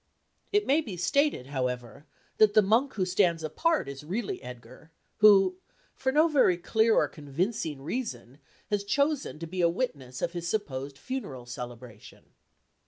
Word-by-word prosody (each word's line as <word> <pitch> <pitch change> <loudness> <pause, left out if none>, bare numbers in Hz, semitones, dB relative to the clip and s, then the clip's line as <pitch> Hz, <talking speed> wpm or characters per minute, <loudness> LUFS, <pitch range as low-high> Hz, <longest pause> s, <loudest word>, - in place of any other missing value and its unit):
It 415 0 +2
may 290 +4 +3
be 210 - -7
stated, 280 - +1
however, 125 -1 -4 0.3
that 215 -1 +5
the 215 - +7
monk 230 +8 +2
who 190 -3 0
stands 180 -3 +2
apart 325 - 0
is 140 +1 -7
really 195 +7 -3
Edgar, 125 +5 -11 0.3
who, 195 -3 +6 0.4
for 265 - -1
no 305 +4 +4
very 270 - +3
clear 220 +5 +2
or - - +3
convincing 150 0 -3
reason, 140 - -5 0.3
has 205 -1 +1
chosen 280 - 0
to 165 - -6
be 180 +2 -3
a 170 - +4
witness 140 - -4
of 170 - -1
his 170 -1 -4
supposed 140 -9 -3
funeral 145 - -6
celebration. 120 -2 -10
180 Hz, 155 wpm, -28 LUFS, 135-225 Hz, 0.4 s, the